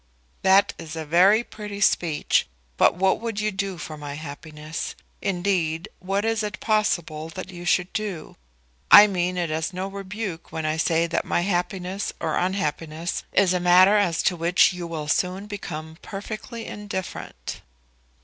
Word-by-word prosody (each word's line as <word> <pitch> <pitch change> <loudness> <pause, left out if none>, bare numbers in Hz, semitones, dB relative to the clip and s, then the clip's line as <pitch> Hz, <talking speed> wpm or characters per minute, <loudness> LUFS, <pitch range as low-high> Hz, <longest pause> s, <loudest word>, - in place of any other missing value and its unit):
"That 195 +1 +5
is 165 -1 -7
a 160 -1 -4
very 190 +8 +5
pretty 210 -3 -8
speech, 170 -6 +2 0.3
but - - +4
what 190 +3 +2
would 225 -3 -3
you 215 0 0
do 195 -1 -3
for 155 -1 -7
my 145 -1 -6
happiness? 155 +1 -6 0.3
Indeed, 175 -4 0
what 195 +3 -1
is 225 0 +1
it 210 0 -4
possible 175 -8 0
that 185 +3 -7
you 175 -1 -9
should 180 +1 +1
do? 210 -7 -4 0.5
I 205 - +11
mean 180 -2 -1
it 170 -3 -1
as 160 +5 -2
no 185 +1 -3
rebuke 195 -3 -6
when 160 -1 -3
I 155 +1 0
say 165 0 +2
that 170 - -1
my - - 0
happiness 185 +1 -2
or - - -1
unhappiness 165 -3 -2
is 190 -2 +3
a 180 - +1
matter 180 +3 +6
as 185 -6 +2
to 180 - +2
which 175 +2 +4
you 175 -1 -5
will 155 -3 -5
soon 185 +5 0
become 160 -6 -7
perfectly 215 +3 -7
indifferent." 205 -3 -6
180 Hz, 160 wpm, -24 LUFS, 165-200 Hz, 0.5 s, I